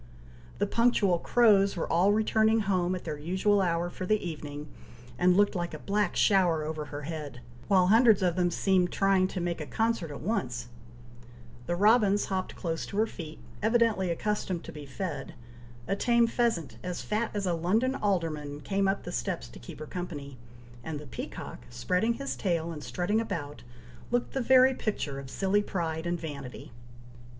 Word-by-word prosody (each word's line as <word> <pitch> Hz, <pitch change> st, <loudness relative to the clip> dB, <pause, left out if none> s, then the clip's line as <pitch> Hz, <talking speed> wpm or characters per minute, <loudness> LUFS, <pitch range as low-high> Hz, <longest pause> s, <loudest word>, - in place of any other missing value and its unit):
The -, -, +1 dB
punctual 205 Hz, -5 st, +2 dB
crows 200 Hz, -3 st, +4 dB
were 165 Hz, -, -1 dB
all 180 Hz, +4 st, +4 dB
returning 220 Hz, +1 st, +3 dB
home 185 Hz, -2 st, +1 dB
at 180 Hz, -, -6 dB
their 150 Hz, -3 st, -5 dB
usual 190 Hz, +6 st, +2 dB
hour 170 Hz, -1 st, 0 dB
for 185 Hz, -, -5 dB
the 215 Hz, -, +4 dB
evening, 150 Hz, -2 st, -6 dB, 0.5 s
and 180 Hz, 0 st, +4 dB
looked 205 Hz, 0 st, +4 dB
like 175 Hz, -2 st, -3 dB
a -, -, -5 dB
black 205 Hz, +1 st, -1 dB
shower 180 Hz, -6 st, +3 dB
over 155 Hz, 0 st, -4 dB
her 145 Hz, 0 st, -7 dB
head, 150 Hz, -4 st, -6 dB, 0.3 s
while 185 Hz, -2 st, +5 dB
hundreds 220 Hz, 0 st, +5 dB
of 175 Hz, -2 st, +2 dB
them 180 Hz, -1 st, +2 dB
seemed 180 Hz, 0 st, +2 dB
trying 195 Hz, -1 st, +3 dB
to 185 Hz, -, -5 dB
make 170 Hz, -2 st, -2 dB
a 150 Hz, -, -5 dB
concert 225 Hz, -7 st, 0 dB
at 145 Hz, -, -8 dB
once; 125 Hz, -, -2 dB, 1.0 s
the 175 Hz, -, 0 dB
robins 205 Hz, +1 st, +4 dB
hopped 185 Hz, -1 st, -2 dB
close 165 Hz, -3 st, -3 dB
to 200 Hz, -, -6 dB
her 220 Hz, -, +4 dB
feet, 160 Hz, -7 st, -8 dB, 0.2 s
evidently 220 Hz, -4 st, +2 dB
accustomed 185 Hz, -1 st, -2 dB
to -, -, -8 dB
be 150 Hz, -2 st, -9 dB
fed; 185 Hz, +6 st, -5 dB, 0.5 s
a 195 Hz, -, +1 dB
tame 235 Hz, +2 st, +3 dB
pheasant, 230 Hz, -8 st, -1 dB
as 180 Hz, -1 st, -4 dB
fat 215 Hz, +2 st, -1 dB
as 200 Hz, -1 st, -1 dB
a 180 Hz, -, +1 dB
London 210 Hz, +10 st, +1 dB
alderman, 165 Hz, -, -1 dB
came 195 Hz, +2 st, 0 dB
up 195 Hz, +1 st, 0 dB
the -, -, -6 dB
steps -, -, -3 dB
to -, -, -12 dB
keep -, -, -10 dB
her 155 Hz, -, -7 dB
company; 150 Hz, -5 st, -6 dB, 0.5 s
and 155 Hz, 0 st, -4 dB
the 150 Hz, -, -10 dB
peacock, 130 Hz, -, -7 dB
spreading 180 Hz, -, 0 dB
his 275 Hz, +2 st, -4 dB
tail, 170 Hz, -3 st, -1 dB
and 150 Hz, -2 st, -7 dB
strutting 205 Hz, +5 st, 0 dB
about, 145 Hz, -9 st, -5 dB, 0.5 s
looked 245 Hz, 0 st, -1 dB
the 270 Hz, -, 0 dB
very 260 Hz, +1 st, +6 dB
picture 155 Hz, -, -3 dB
of 135 Hz, -1 st, -9 dB
silly 195 Hz, +7 st, +1 dB
pride 165 Hz, -4 st, -3 dB
and 175 Hz, 0 st, -1 dB
vanity. 140 Hz, -8 st, -7 dB
180 Hz, 180 wpm, -29 LUFS, 160-210 Hz, 1.0 s, very